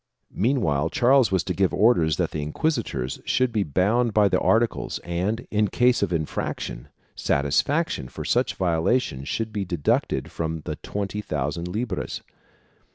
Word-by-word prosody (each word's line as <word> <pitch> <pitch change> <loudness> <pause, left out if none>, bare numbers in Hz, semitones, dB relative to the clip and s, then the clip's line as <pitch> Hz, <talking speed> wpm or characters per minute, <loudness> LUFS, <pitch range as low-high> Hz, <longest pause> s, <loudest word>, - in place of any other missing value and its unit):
Meanwhile 95 - +1
Charles 130 +4 +4
was 95 -3 +2
to 90 - -2
give 95 +1 +1
orders 90 -8 +3
that - - 0
the 75 - -3
inquisitors 75 - -2
should 130 -1 +1
be 110 -2 0
bound 100 - +1
by 105 -2 +5
the - - +2
articles 115 +1 +1
and, 90 +7 -2
in 105 0 +2
case 125 +5 +2
of - - 0
infraction, 80 -6 -3 0.3
satisfaction 75 - 0
for - - -7
such - - +1
violations 85 - 0
should 110 -1 -2
be 105 -2 -1
deducted 85 -5 -1
from 80 -1 -3
the 75 0 -5
twenty 105 +1 -4
thousand 75 0 -3
libras. 110 +7 -3
95 Hz, 150 wpm, -24 LUFS, 80-115 Hz, 0.3 s, by